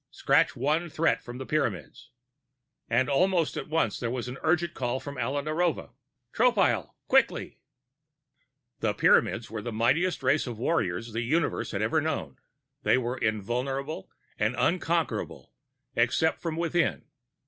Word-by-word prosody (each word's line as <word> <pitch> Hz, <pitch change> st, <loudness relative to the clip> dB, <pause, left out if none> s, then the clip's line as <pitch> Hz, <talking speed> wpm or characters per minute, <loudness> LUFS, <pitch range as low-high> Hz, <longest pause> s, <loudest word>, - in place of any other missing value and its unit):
Scratch -, -, +2 dB
one 160 Hz, +4 st, 0 dB
threat 155 Hz, -7 st, +1 dB
from 120 Hz, 0 st, -8 dB
the 130 Hz, -, -6 dB
Pyramids 110 Hz, -, -2 dB, 0.8 s
And 120 Hz, +3 st, +2 dB
almost 170 Hz, +3 st, +2 dB
at -, -, -5 dB
once, 165 Hz, +1 st, 0 dB
there 120 Hz, -, -2 dB
was 125 Hz, 0 st, -3 dB
another 125 Hz, +5 st, -6 dB
urgent 170 Hz, 0 st, +2 dB
call 125 Hz, 0 st, -2 dB
from 140 Hz, -1 st, -7 dB
Alia 135 Hz, +4 st, -1 dB
Narova: 160 Hz, +3 st, -1 dB, 0.4 s
"Tropile, -, -, +2 dB
quickly!" -, -, +2 dB, 1.2 s
The 105 Hz, -2 st, 0 dB
Pyramids 115 Hz, -1 st, +3 dB
were 110 Hz, -1 st, -4 dB
the 120 Hz, -, -5 dB
mightiest 150 Hz, +10 st, +1 dB
race 135 Hz, +2 st, +2 dB
of 120 Hz, -3 st, -5 dB
warriors 115 Hz, -, -1 dB
the 115 Hz, -, -1 dB
Universe 155 Hz, +7 st, 0 dB
had -, -, -2 dB
ever -, -, +2 dB
known. -, -, -3 dB, 0.4 s
They -, -, +3 dB
were 125 Hz, 0 st, -2 dB
invulnerable 125 Hz, +5 st, -2 dB, 0.3 s
and -, -, +1 dB
unconquerable, -, -, -1 dB, 0.4 s
except 160 Hz, 0 st, +2 dB
from 165 Hz, -2 st, -3 dB
within. 170 Hz, -1 st, 0 dB
135 Hz, 140 wpm, -28 LUFS, 120-160 Hz, 1.2 s, Pyramids